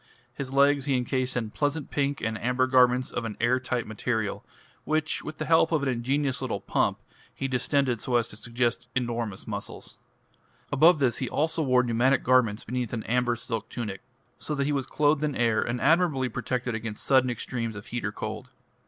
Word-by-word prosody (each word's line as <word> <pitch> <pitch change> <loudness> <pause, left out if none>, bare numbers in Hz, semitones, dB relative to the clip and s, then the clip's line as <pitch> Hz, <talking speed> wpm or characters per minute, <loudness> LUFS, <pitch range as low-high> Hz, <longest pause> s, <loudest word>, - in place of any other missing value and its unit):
His 135 -2 -5
legs 140 0 +4
he 140 -2 +1
encased 130 +1 -1
in 110 -3 -2
pleasant 145 +2 -2
pink 140 0 0
and 115 0 -1
amber 125 +1 +2
garments 130 -1 +3
of - - -3
an 110 -2 -5
air 120 +2 +3
tight 125 -2 -2
material, 110 -1 -2 0.4
which 155 0 0
with 155 0 -7
the 155 - -3
help 160 +1 +4
of 155 -3 +1
an 140 - +1
ingenious 135 +3 0
little 130 -3 -2
pump - - 0 0.4
he 135 - -2
distended 130 -2 0
so 125 - -1
as 120 -1 +2
to - - -9
suggest 120 +2 -2
enormous 120 -5 -2
muscles. - - -7 0.7
Above 165 +4 +6
this 130 -5 +1
he 130 - -2
also 160 +2 0
wore 125 -4 +3
pneumatic 125 +2 +2
garments 120 -4 +3
beneath 125 -1 -3
an 110 -2 -3
amber 125 0 +1
silk 115 -2 -4
tunic, 105 -6 -5 0.4
so 150 - -3
that 140 -1 0
he 150 - 0
was 135 -3 -1
clothed 150 0 +2
in 150 -2 0
air 115 -2 +2
and 120 +1 -2
admirably 150 -3 +3
protected 125 +2 -2
against 110 -1 -5
sudden 130 -2 +4
extremes 115 -2 -3
of 105 - -8
heat 120 0 -4
or 100 - -1
cold. 110 +4 -6
125 Hz, 195 wpm, -27 LUFS, 115-140 Hz, 0.7 s, Above